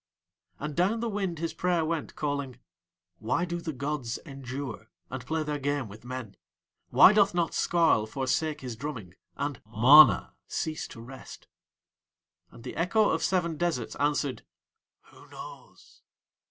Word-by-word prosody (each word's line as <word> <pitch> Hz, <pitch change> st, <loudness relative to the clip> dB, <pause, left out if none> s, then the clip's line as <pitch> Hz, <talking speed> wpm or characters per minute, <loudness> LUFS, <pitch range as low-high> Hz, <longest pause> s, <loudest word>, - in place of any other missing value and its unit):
And 150 Hz, 0 st, -5 dB
down 195 Hz, +6 st, +2 dB
the 235 Hz, -, -2 dB
wind 195 Hz, -5 st, -2 dB
his 165 Hz, +1 st, -3 dB
prayer 175 Hz, -3 st, +1 dB
went 160 Hz, -1 st, -3 dB
calling: 140 Hz, -4 st, -3 dB, 0.6 s
"Why 120 Hz, +10 st, 0 dB
do 175 Hz, -1 st, -4 dB
the 165 Hz, -, -3 dB
gods 140 Hz, -3 st, -3 dB
endure, 135 Hz, -5 st, -7 dB, 0.2 s
and 130 Hz, -2 st, -5 dB
play 155 Hz, +5 st, -1 dB
their 150 Hz, -1 st, -3 dB
game 145 Hz, -2 st, -1 dB
with 105 Hz, +3 st, -12 dB
men? 125 Hz, -5 st, -7 dB, 0.5 s
Why 200 Hz, -, +8 dB
doth 205 Hz, -3 st, +4 dB
not 170 Hz, -1 st, 0 dB
Skarl 165 Hz, -11 st, +2 dB
forsake 145 Hz, +5 st, -1 dB
his 125 Hz, -3 st, -5 dB
drumming, 115 Hz, -, -6 dB, 0.2 s
and 145 Hz, -2 st, -3 dB
MANA 120 Hz, +2 st, +7 dB
cease 155 Hz, -1 st, -3 dB
to 115 Hz, -, -11 dB
rest?" 130 Hz, +3 st, -11 dB, 1.0 s
and 115 Hz, -, -15 dB
the -, -, -7 dB
echo 205 Hz, +5 st, +2 dB
of 160 Hz, -, 0 dB
seven 170 Hz, -4 st, 0 dB
deserts 160 Hz, -9 st, -1 dB
answered: 145 Hz, -2 st, 0 dB, 0.7 s
"Who -, -, -17 dB
knows? -, -, -12 dB
145 Hz, 145 wpm, -28 LUFS, 130-170 Hz, 1.0 s, Why